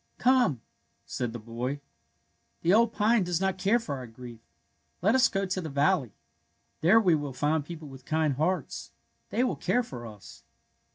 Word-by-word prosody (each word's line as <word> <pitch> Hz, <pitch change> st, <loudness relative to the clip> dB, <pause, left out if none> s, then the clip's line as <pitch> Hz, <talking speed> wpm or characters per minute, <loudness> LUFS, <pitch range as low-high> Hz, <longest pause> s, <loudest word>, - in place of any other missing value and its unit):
Come,'' 245 Hz, -, +3 dB, 0.4 s
said 120 Hz, -2 st, -3 dB
the 120 Hz, -, -6 dB
boy. 120 Hz, +4 st, -4 dB
'^ -, -, -13 dB, 0.8 s
The 175 Hz, -, +4 dB
old 230 Hz, +1 st, +5 dB
pine 220 Hz, 0 st, +3 dB
does 175 Hz, -2 st, -1 dB
not 190 Hz, -1 st, -1 dB
care 200 Hz, +5 st, +3 dB
for 150 Hz, -, -4 dB
our 125 Hz, -1 st, -7 dB
grief. 120 Hz, 0 st, -11 dB, 0.6 s
Let 205 Hz, +4 st, +4 dB
us 260 Hz, 0 st, +5 dB
go 195 Hz, 0 st, -1 dB
to 185 Hz, 0 st, -2 dB
the 160 Hz, -, -5 dB
valley. 140 Hz, -, +1 dB, 0.7 s
There 185 Hz, +8 st, +6 dB
we 185 Hz, -6 st, +4 dB
will 145 Hz, -3 st, -1 dB
find 145 Hz, +4 st, 0 dB
people 160 Hz, 0 st, -9 dB
with 135 Hz, -2 st, -12 dB
kind 155 Hz, 0 st, +1 dB
hearts. 160 Hz, +7 st, -2 dB, 0.4 s
They 245 Hz, -, +1 dB
will 255 Hz, -, 0 dB
care 245 Hz, -, +1 dB
for 125 Hz, -, -8 dB
us." 105 Hz, -3 st, -13 dB
160 Hz, 180 wpm, -28 LUFS, 130-195 Hz, 0.8 s, There